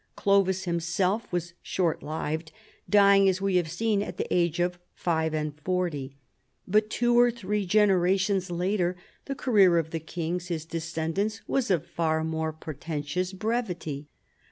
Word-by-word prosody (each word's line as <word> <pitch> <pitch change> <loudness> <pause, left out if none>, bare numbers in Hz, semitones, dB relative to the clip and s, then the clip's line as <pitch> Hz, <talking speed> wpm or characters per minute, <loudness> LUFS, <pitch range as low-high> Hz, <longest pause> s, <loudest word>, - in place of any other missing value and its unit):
Clovis 195 -2 +2
himself 180 +5 -1
was 175 -1 -2
short 175 -4 -1
lived, 155 +1 -4 0.4
dying, 200 -1 +6
as 185 0 0
we 195 -1 +1
have 170 -3 0
seen, 210 +4 0
at - - -5
the - - -1
age 170 -1 +1
of 175 0 0 0.2
five 160 -2 0
and 150 -1 -2
forty. 150 -6 -2 0.5
But 215 +3 +2
two 240 +1 +3
or 245 0 +6
three 210 -4 -2
generations 195 -1 +3
later 180 +1 0 0.3
the 275 - -4
career 200 -10 +4
of 160 -1 -1
the 165 - -2
kings, 170 +2 -4
his 165 -3 -3
descendants, 170 +6 -2
Avas 265 -5 0
of 175 -6 +1
far 160 -1 0
more 160 0 -1
portentous 155 +3 -4
brevity. 185 - -3
180 Hz, 150 wpm, -27 LUFS, 160-200 Hz, 0.5 s, dying